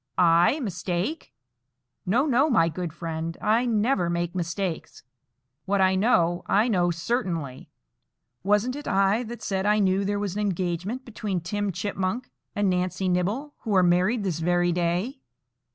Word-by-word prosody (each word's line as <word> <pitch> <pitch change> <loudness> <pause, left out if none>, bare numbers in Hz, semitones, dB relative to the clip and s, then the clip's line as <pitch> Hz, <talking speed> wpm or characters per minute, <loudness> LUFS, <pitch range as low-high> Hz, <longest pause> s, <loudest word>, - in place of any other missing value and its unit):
"I 175 - +4
mistake! 190 - -3 0.8
No, 240 +9 +3
no, 275 +1 +3
my 165 - +3
good 170 +1 -4
friend; 165 0 -5
I 225 +4 +2
never 215 -5 +1
make 170 0 -2
mistakes. 175 0 -4 0.6
What 200 +1 +1
I 190 0 +4
know, 175 -4 +2
I 210 +4 +3
know 180 -6 +2
certainly. 170 - -3 0.7
Wasn't 210 +6 +1
it 290 - -7
I 195 +3 +2
that 240 0 -7
said 195 0 -1
I 210 0 +4
knew 195 -1 +2
there 205 +1 -1
was 200 -3 -2
an 210 - -2
engagement 190 +5 -2
between 210 -5 -3
Tim 205 +4 -2
Chipmunk 195 +6 -3 0.2
and 205 -1 +1
Nancy 180 0 0
Nibble, 205 +12 -1
who 215 -3 -2
are 185 - +5
married 185 +6 +2
this 175 -5 -2
very 175 +1 +2
day? 180 - -1
190 Hz, 150 wpm, -25 LUFS, 175-215 Hz, 0.8 s, are